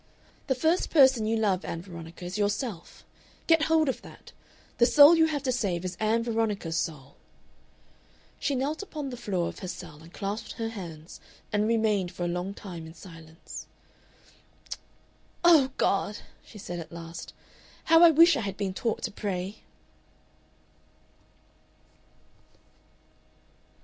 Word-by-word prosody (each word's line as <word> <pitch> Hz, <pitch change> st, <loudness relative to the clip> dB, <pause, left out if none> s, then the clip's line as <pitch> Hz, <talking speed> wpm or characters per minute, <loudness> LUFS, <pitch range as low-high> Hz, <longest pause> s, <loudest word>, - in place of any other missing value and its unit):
"The 265 Hz, -, +1 dB
first 320 Hz, +7 st, +1 dB
person 265 Hz, -7 st, +5 dB
you 225 Hz, +1 st, +1 dB
love, 200 Hz, -4 st, +1 dB
Ann 165 Hz, 0 st, -5 dB
Veronica, 170 Hz, -1 st, -10 dB
is 180 Hz, -, -5 dB
yourself 205 Hz, -2 st, -3 dB, 0.4 s
get 325 Hz, -2 st, +4 dB
hold 320 Hz, -1 st, +3 dB
of 265 Hz, -, -2 dB
that! -, -, -14 dB, 0.5 s
The 240 Hz, -, +6 dB
soul 295 Hz, +4 st, +8 dB
you 320 Hz, -1 st, +4 dB
have 290 Hz, -3 st, -2 dB
to 260 Hz, -, +1 dB
save 190 Hz, -8 st, -1 dB
is 185 Hz, -1 st, -4 dB
Ann 220 Hz, +2 st, +1 dB
Veronica's 220 Hz, -7 st, -1 dB
soul...." 145 Hz, -5 st, -4 dB, 1.2 s
She 285 Hz, -, 0 dB
knelt 285 Hz, +6 st, -2 dB
upon 300 Hz, -8 st, -6 dB
the -, -, -5 dB
floor 190 Hz, -7 st, -2 dB
of -, -, -7 dB
her 185 Hz, -, -6 dB
cell 175 Hz, -4 st, -8 dB
and 165 Hz, +1 st, -14 dB
clasped 200 Hz, +4 st, -5 dB
her 225 Hz, -1 st, -3 dB
hands, 170 Hz, -7 st, -9 dB, 0.3 s
and 210 Hz, +1 st, +2 dB
remained 215 Hz, -5 st, +1 dB
for 175 Hz, -, -4 dB
a -, -, 0 dB
long 180 Hz, +3 st, -3 dB
time 175 Hz, -7 st, -8 dB
in 160 Hz, -, -12 dB
silence. 165 Hz, -2 st, -11 dB, 1.8 s
"Oh, 320 Hz, -6 st, +6 dB
God!" 205 Hz, +1 st, +1 dB, 0.3 s
she 215 Hz, -, -14 dB
said 175 Hz, -3 st, -6 dB
at 165 Hz, -, -9 dB
last, 170 Hz, 0 st, -8 dB, 0.5 s
"how 325 Hz, +1 st, +6 dB
I 340 Hz, -, +10 dB
wish 330 Hz, +2 st, +6 dB
I 260 Hz, -, -1 dB
had 195 Hz, -2 st, -4 dB
been 195 Hz, -2 st, -2 dB
taught 225 Hz, +3 st, -2 dB
to 225 Hz, -, -2 dB
pray!" 195 Hz, 0 st, -4 dB
210 Hz, 145 wpm, -28 LUFS, 175-260 Hz, 1.8 s, I